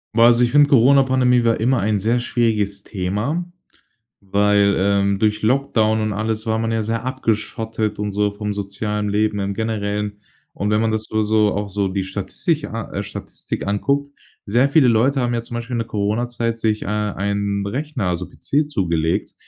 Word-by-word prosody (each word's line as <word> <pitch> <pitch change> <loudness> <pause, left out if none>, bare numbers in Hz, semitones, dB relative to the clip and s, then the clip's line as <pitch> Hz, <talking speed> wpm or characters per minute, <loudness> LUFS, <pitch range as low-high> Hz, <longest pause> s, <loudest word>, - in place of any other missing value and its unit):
Ja, 115 - +5
also 120 +1 +5
ich 120 - +2
finde, 145 +1 +5
Coronapandemie 130 -1 +4
war 115 -1 +2
immer 125 +3 +2
ein 105 +1 +1
sehr 115 +5 +1
schwieriges 105 -5 0
Thema, 105 - -2 0.8
weil, 100 0 +2
ähm, 100 0 +2
durch 105 0 +1
Lockdown 110 -3 +2
und 110 -1 -1
alles 110 +2 -2
war 110 0 +1
man 115 0 -1
ja 115 -1 0
sehr 115 +2 -2
abgeschottet 110 -3 -2
und 105 0 -2
so, 105 +1 +1
vom 105 0 -4
sozialen 105 +1 -3
Leben 105 0 +1
im 100 0 -2
Generellen. 105 -1 -2 0.4
Und 100 +1 -2
wenn 105 0 +2
man 115 0 +1
das 110 0 -2
nur 110 0 +1
so 105 -1 +2
auch 100 +1 -2
so 100 0 0
die 95 0 -2
Statistik 100 - -2
a 115 0 -6
äh, 100 - -2
Statistik 100 - -6
anguckt, 140 +8 0 0.4
sehr 120 +6 +3
viele 140 -2 +4
Leute 125 +5 +3
haben 120 -1 0
ja 115 - -1
zum 120 - -10
Beispiel 120 +1 -4
in - - 0
der 115 - -2
Corona-Zeit 115 +2 -1
sich, 110 -1 0
äh, - - -4
einen 100 -1 -1
Rechner, 135 0 -3
also 90 0 -2
PC 145 +1 -1
zugelegt 85 - -1
110 Hz, 185 wpm, -20 LUFS, 100-120 Hz, 0.8 s, Ja